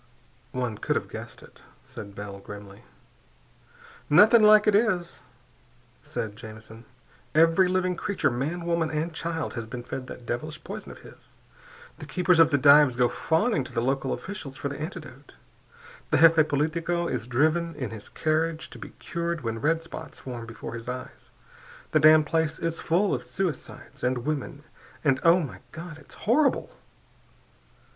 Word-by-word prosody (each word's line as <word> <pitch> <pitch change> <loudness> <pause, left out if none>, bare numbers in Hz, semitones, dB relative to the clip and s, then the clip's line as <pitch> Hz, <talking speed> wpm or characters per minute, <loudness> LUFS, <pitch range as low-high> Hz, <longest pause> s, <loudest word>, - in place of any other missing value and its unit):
"One 125 -4 -3
could - - -1
have - - -2
guessed - - -9
it," - - -18 0.2
said 100 -1 -10
Bell 100 -1 -7
grimly. 100 0 -11 1.2
"Nothing 220 +9 +7
like 215 0 +7
it 210 - +4
is," 195 -5 +1 0.8
said 105 -2 -5
Jamison. 110 +1 -11 0.5
"Every 165 +4 +5
living 185 0 0
creature, 195 -4 0
man, 155 +8 -3
woman, 170 -1 +1
and 160 +2 -2
child, 160 0 -3
has 115 -2 -5
been 120 +1 -7
fed 130 +1 -6
that 125 - -10
devilish 155 +6 -5
poison 210 +3 -7
of - - -13
his. - - -16 0.6
The - - -8
keepers 180 -2 +2
of 165 -1 +7
the 145 - +2
dives 140 -2 +6
go 125 -1 +3
fawning 165 - +1
to - - -11
the - - -1
local 135 +2 0
officials 175 -10 -6
for 140 - -3
the 140 +1 -7
antidote. 155 -5 -8 0.7
The - - +3
jefe 160 0 +6
politico 165 +4 0
is 120 -5 -3
driven 160 +6 +1
in 130 -7 -4
his 110 -2 -9
carriage 155 0 -1
to - - -10
be - - -10
cured 170 -1 -3
when 115 -2 -4
red 165 +3 +1
spots 165 - -9
form 120 -3 -7
before 115 0 -8
his 115 +1 -7
eyes. 130 0 -8 0.6
The 155 - +4
damned 155 0 +7
place 160 +1 0
is 165 -1 -3
full 185 +5 +2
of - - -2
suicides, 185 -5 -5
and 125 -1 0
women, 145 -1 -3 0.4
and 135 -4 +3
oh, 170 +2 +6
my 145 - -6
God! 165 0 -9
It's 145 - -15
horrible!" 275 +6 +2
155 Hz, 165 wpm, -26 LUFS, 125-170 Hz, 1.2 s, Nothing